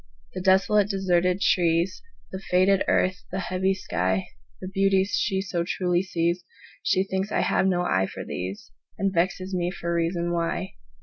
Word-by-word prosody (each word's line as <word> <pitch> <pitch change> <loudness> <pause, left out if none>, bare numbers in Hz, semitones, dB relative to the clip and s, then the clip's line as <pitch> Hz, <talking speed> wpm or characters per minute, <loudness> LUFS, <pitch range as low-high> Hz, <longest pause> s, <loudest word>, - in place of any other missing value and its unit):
The 185 - -4
desolate, 195 +2 +3
deserted 180 -1 +1
trees, 170 0 +2 0.3
The 190 - -6
faded 185 +2 +4
earth, 185 +4 +1
the 190 - -3
heavy 190 +1 0
sky, 95 - -1 0.3
The 185 - -6
beauties 195 0 +2
she 190 0 0
so 180 -3 -2
truly 180 0 0
sees, 175 -1 -1 0.4
She 190 - +2
thinks 195 +1 -3
I - - +1
have 190 - +2
no 180 -2 +1
eye 95 - +1
for - - -7
these, 95 +2 -6 0.3
And 195 -1 0
vexes 185 +2 0
me 175 -1 0
for 170 -2 -4
reason 170 +1 0
why. 170 +2 -2
185 Hz, 165 wpm, -25 LUFS, 170-190 Hz, 0.4 s, faded